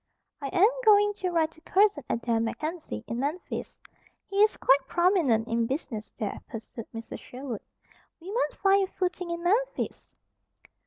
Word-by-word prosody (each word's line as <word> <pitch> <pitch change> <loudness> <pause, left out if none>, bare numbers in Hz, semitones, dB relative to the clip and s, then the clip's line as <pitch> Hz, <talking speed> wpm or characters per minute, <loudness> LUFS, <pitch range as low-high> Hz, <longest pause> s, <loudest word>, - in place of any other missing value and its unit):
"I 280 - -2
am 365 +8 +5 0.2
going 415 -2 +6
to 370 -2 -1
write 325 -2 +1
to 320 - -20
Cousin 390 -6 +3
Adair 230 0 0
MacKenzie, 305 - -3
in 235 - -4
Memphis. 295 +7 -4 0.5
He 395 - -5
is 425 0 +4
quite 270 0 +4
prominent 340 - +3
in 230 0 +1
business 255 -6 -4
there," 210 -2 -3
pursued 225 0 -8
Mrs. 225 0 -7
Sherwood. 250 -4 -7 0.6
"We 355 +4 -8
might 475 +4 0
find 390 0 +3
a - - -27
footing 360 -1 -2
in 340 0 -3
Memphis." 475 +8 -1
325 Hz, 155 wpm, -28 LUFS, 235-385 Hz, 0.6 s, going